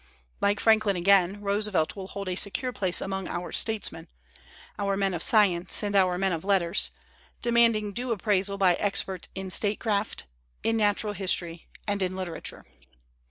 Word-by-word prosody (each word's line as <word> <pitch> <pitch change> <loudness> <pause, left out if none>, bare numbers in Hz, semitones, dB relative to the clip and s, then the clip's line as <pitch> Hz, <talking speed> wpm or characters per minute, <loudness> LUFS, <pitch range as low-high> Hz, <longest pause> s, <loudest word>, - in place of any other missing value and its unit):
Like 205 +1 +1
Franklin 220 -3 +3
again, 195 +2 +3
Roosevelt 200 -4 0
will 190 -2 -7
hold 200 0 -7
a 180 - -2
secure 245 +7 -1
place 185 -5 -1
among 195 -1 -4
our 175 +1 -5
statesmen, 220 -2 -1 0.7
our 200 -1 -1
men 195 -1 0
of 170 - -4
science 190 -3 +4
and 205 -1 -2
our 185 -2 +3
men 190 0 0
of 160 - -4
letters, 190 -2 +1 0.5
demanding 230 -3 +2
due 245 +3 -3
appraisal 200 -2 0
by 190 -2 +4
experts 190 -1 -1
in 190 -1 -5
statecraft, 205 +1 0 0.4
in 225 - +1
natural 210 -1 +1
history 175 -4 -2 0.2
and 205 -1 -1
in 185 0 -1
literature. 185 -3 -6
200 Hz, 155 wpm, -26 LUFS, 185-210 Hz, 0.7 s, science